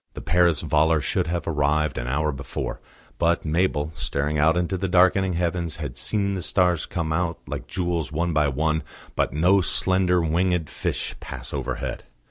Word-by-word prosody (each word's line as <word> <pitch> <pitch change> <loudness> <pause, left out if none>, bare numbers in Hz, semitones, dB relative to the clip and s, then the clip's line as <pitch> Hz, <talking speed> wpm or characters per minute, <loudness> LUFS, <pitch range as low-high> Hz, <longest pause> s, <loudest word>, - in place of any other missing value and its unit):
The - - -5
Paris 85 -1 +3
volor 80 +1 +3
should 75 - 0
have 85 +1 -2
arrived 75 -1 +1
an - - -4
hour 75 +4 0
before, 70 -1 -5 0.4
but 85 0 +2
Mabel, 80 -2 0
staring 75 +2 -1
out 80 +3 +4
into 90 +2 0
the 95 +1 -1
darkening 95 +1 +4
heavens 85 -1 -1
had 75 -6 -6
seen 100 - 0
the 95 - -3
stars 90 -2 +2
come 80 -3 -2
out 85 0 -1
like - - -6
jewels 85 -4 -2
one 85 +2 -1
by 75 -1 +3
one, 80 +3 0 0.3
but - - +1
no 90 +6 +4
slender 95 +1 +2
winged 85 0 0
fish - - -2
pass 65 -2 -7
overhead. - - -4
85 Hz, 170 wpm, -24 LUFS, 75-90 Hz, 0.4 s, out